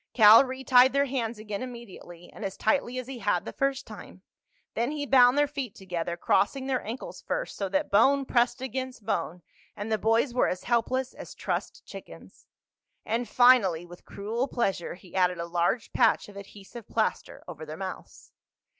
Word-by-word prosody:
Cal 220 +1 +9
retied 260 -1 +4
their 280 0 +3
hands 240 -4 -3
again 210 -1 -6
immediately, 230 -8 -10
and - - -9
as 195 -1 -4
tightly 240 +2 0
as 255 - -4
he 260 -1 -8
had 195 -5 0
the - - -7
first 275 -1 -1
time. - - -12 0.5
Then 235 +3 -1
he 295 -1 -3
bound 255 -1 +5
their 290 0 +3
feet 275 -7 -6
together, 175 -2 -4
crossing 260 +9 +1
their 265 -1 -1
ankles 230 +4 -7
first - - -4
so 195 -2 -3
that 190 - -1
bone 270 +7 +4
pressed 240 0 +1
against 260 -3 -5
bone 170 0 -3 0.3
and 205 +2 -6
the 215 - +1
boys 225 +4 +1
were 250 - +2
as 180 - -3
helpless 250 +2 0
as - - -10
trussed - - -4
chickens. - - -13 0.6
And 235 +2 -2
finally, 220 -10 +4
with 175 0 -14
cruel 225 +6 -3
pleasure, 195 -10 -2
he 180 0 -18
added 180 -1 +2
a 170 - -4
large 175 +7 -1
patch - - +2
of 205 - -14
adhesive 200 +3 -11
plaster 220 -1 -2
over 160 -3 -8
their 155 0 -8
mouths. 190 0 -8
230 Hz, 180 wpm, -27 LUFS, 195-255 Hz, 0.6 s, Cal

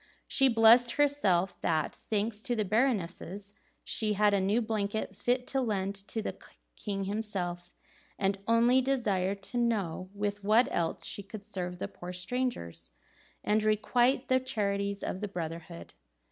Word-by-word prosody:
She 270 - +4
blessed 230 +1 +6
herself 205 -12 +2
that, 160 -2 0
thanks 215 0 -2
to 245 0 -1
the 215 -2 0
Baroness, 200 -3 -1 0.3
she 215 -1 0
had 210 0 +3
a 200 - +3
new 200 +5 +2
blanket 215 -3 -2
fit 245 +5 0
to 270 -1 0
lend 200 -5 -1
to 220 - -3
the - - -3 0.4
king 200 -2 -3
himself, 190 -4 -3 0.4
and 195 0 0
only 235 +3 +5
desired 200 -7 0
to 245 - -3
know 200 -6 -1
with 205 0 -2
what 220 +5 +4
else 165 -1 -1
she - - -3
could 200 +1 -9
serve 180 -4 -4
the - - -3
poor 180 +1 -8
strangers 180 - -3 0.5
and 215 +1 +2
requite 240 +5 +2
the 260 0 +4
charities 200 -5 -2
of 185 - -3
the 210 - -2
brotherhood. 165 - -6
205 Hz, 150 wpm, -30 LUFS, 190-235 Hz, 0.5 s, blessed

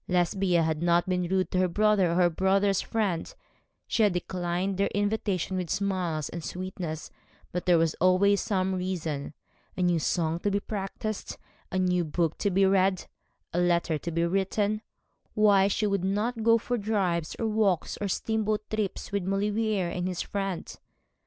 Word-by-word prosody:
Lesbia 180 0 +2
had 160 -1 -1
not 170 +1 +3
been 180 -1 0
rude 190 +1 0
to 185 - +1
her 185 - +3
brother 205 0 +3
or - - 0
her 175 -1 +4
brother's 195 +2 +2
friend; 200 -7 -1 0.5
she 230 - 0
had 210 -2 +5
declined 180 +1 -2
their 200 - +3
invitations 205 -3 0
with 180 -3 -4
smiles 185 -5 -1
and 170 -1 -6
sweetness; 180 -3 -5 0.4
but 180 +1 -4
there 175 -1 +6
was 165 -1 +2
always 190 +2 +4
some 190 -2 0
reason 165 -6 -3 0.4
a 185 - 0
new 175 -2 +3
song 160 +1 0
to 205 - 0
be 200 0 +1
practised, 205 +1 -5 0.3
a 185 - -1
new 180 -1 +2
book 165 0 -1
to 205 - +1
be 195 +1 +3
read, 190 -1 +2 0.5
a 175 - +1
letter 170 -3 +1
to 170 - -5
be 170 0 0
written 200 +4 0 0.5
why 205 -2 +5
she 205 +2 0
should 200 -3 0
not 215 +5 -1
go 230 +1 +5
for 245 +1 -2
drives 190 -6 -1
or 230 - -2
walks 210 -6 +1
or 205 - 0
steamboat 215 +1 -1
trips 215 -3 -3
with 200 -2 -1
Maulevrier 205 0 0
and 180 +1 -2
his 180 -1 -2
friend. 195 -3 -4
185 Hz, 170 wpm, -28 LUFS, 175-205 Hz, 0.5 s, there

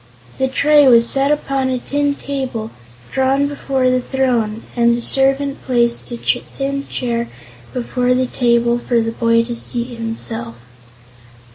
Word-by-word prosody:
The 265 - +2
tray 290 +2 +4
was 235 -2 +6
set 275 +2 +3
upon 275 -3 0
a 255 - 0
tin 285 +3 -1
table 260 -6 -4 0.4
drawn 270 +1 +2
before 270 -2 0
the 255 0 +1
throne, 240 -5 -1
and 235 0 +3
the - - -3
servant 275 +2 +2
placed 235 -2 0
a 240 - -5
tin 275 +3 -2
chair 235 -1 -2 0.4
before 250 0 0
the 255 0 +1
table 235 -1 +1
for 240 0 0
the 225 0 -1
boy 230 0 +2
to 240 0 -5
seat 240 +1 -4
himself. 170 - -5
250 Hz, 145 wpm, -18 LUFS, 235-270 Hz, 0.4 s, was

